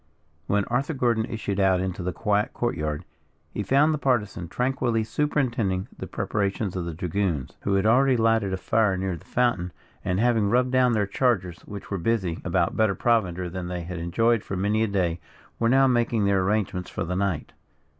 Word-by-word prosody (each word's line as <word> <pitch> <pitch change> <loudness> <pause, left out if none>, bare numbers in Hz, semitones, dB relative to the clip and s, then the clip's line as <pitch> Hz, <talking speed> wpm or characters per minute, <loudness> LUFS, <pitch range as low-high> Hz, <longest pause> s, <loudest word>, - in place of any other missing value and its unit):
When 100 0 +1
Arthur 135 +6 -1
Gordon 120 -4 +1
issued 105 -3 -3
out 95 -2 +3
into 95 0 -3
the 90 +1 -2
quiet 105 +4 0
court 120 - -1
yard, 75 -2 -3 0.5
he - - -2
found 140 +9 +3
the 150 - -2
Partisan 105 -10 0
tranquilly 125 +1 0
superintending 120 -8 -1
the - - -7
preparations 100 -1 -2
of 90 -2 -2
the 85 - -4
dragoons, 85 -4 -2
who 100 - 0
had 100 +1 +1
already 130 +3 +4
lighted 115 -3 +2
a 95 - -1
fire 105 -1 +1
near 95 -1 -2
the 80 - -13
fountain 120 -8 0 0.3
and 90 +1 0
having 115 -3 +2
rubbed 125 +3 +2
down 130 -1 +3
their 105 -2 +2
chargers 95 -6 0
which 100 0 -8
were 100 - -1
busy 95 -4 -1
about - - 0
better 110 -3 +2
provender 95 -5 +1
than 90 0 -5
they 90 0 -4
had 90 0 -6
enjoyed 115 +7 +2
for 95 - -4
many 105 +3 +1
a 110 - +2
day, 90 -4 0 0.4
were 115 - +2
now 135 +2 +5
making 120 -4 +2
their 100 -1 +3
arrangements 95 -3 -1
for 110 - -3
the 90 +2 -3
night. 95 -6 -1
100 Hz, 195 wpm, -25 LUFS, 90-120 Hz, 0.5 s, now